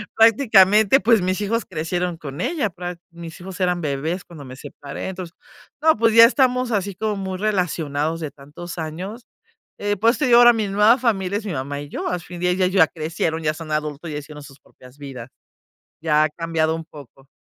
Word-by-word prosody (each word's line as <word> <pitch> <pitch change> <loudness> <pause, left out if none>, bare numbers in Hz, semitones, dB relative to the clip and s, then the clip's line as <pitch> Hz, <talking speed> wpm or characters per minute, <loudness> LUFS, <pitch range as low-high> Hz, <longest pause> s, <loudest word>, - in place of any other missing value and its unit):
Prácticamente, 220 0 +5
pues 225 -3 +4
mis 185 +1 -1
hijos 230 +3 -1
crecieron 175 +2 -3
con 145 -3 -7
ella, 290 -11 -1
prac 175 -1 -7
mis 170 +1 -10
hijos 190 +1 -9
eran 180 -1 +1
bebés 155 +5 -3
cuando 160 -4 -12
me 130 0 -10
separé, 145 0 -8
entonces. 180 -2 -7 0.5
No, 320 0 +5
pues 230 0 +3
ya 230 0 +10
estamos 250 -1 +2
así 200 -1 -1
como 215 +2 -2
muy 190 -1 -4
relacionados 165 -6 -1
de 150 - -4
tantos 150 +6 -10
años. 180 +9 -6 0.5
Eh, 205 0 -1
por 225 +4 +3
eso - - -6
te 300 - +1
digo 240 -1 +6
ahora 240 0 +8
mi 220 -2 -1
nueva 210 +5 +4
familia 205 -5 0
es 215 - -7
mi 195 - -3
mamá 140 +1 -4
y 145 - -8
yo. - - -4
Asfin 175 0 -5
día 180 0 +2
ya 185 0 +1
ellos 185 +2 0
ya - - +2
crecieron, 160 0 -3
ya 155 0 +1
son 155 -1 -9
adultos 150 +1 -3
ya 150 - -4
hicieron 150 0 -11
sus 140 -1 -15
propias 125 +2 -19
vidas. 135 -4 -9 0.7
Ya 155 -1 +3
ha 155 - +1
cambiado 160 0 -1
un 165 -1 -7
poco. 140 -3 -15
175 Hz, 205 wpm, -21 LUFS, 155-210 Hz, 0.7 s, ya